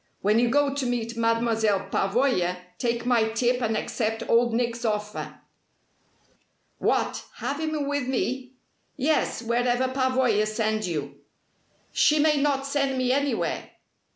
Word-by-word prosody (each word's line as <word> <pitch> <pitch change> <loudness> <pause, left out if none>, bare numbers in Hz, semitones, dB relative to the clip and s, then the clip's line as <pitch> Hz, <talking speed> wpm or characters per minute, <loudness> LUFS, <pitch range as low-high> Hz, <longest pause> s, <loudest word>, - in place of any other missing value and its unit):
When 210 +3 +4
you 240 0 +3
go 285 +1 +2
to 280 -2 -2
meet 235 -1 -2
Mademoiselle 230 -3 +1
Pavoya 195 -4 +1 0.2
take 235 -1 -1
my 235 -3 +3
tip 245 +2 +1
and 220 -2 0
accept 225 -1 -2
Old 235 +1 +3
Nick's 235 0 -1
offer." 210 -2 -3 1.4
"What, - - 0
have 285 +1 -3
him 310 -2 -2
with 285 -2 -1
me?" 260 0 -2 0.4
"Yes, 285 -3 0
wherever 245 +2 +1
Pavoya 255 -5 +2
sends 215 -1 -1
you." 145 -4 -4 0.7
"She 305 - +4
may 300 0 +3
not 275 -1 +1
send 275 -1 0
me 255 -1 +1
anywhere." 280 +1 -1
240 Hz, 130 wpm, -26 LUFS, 220-270 Hz, 1.4 s, When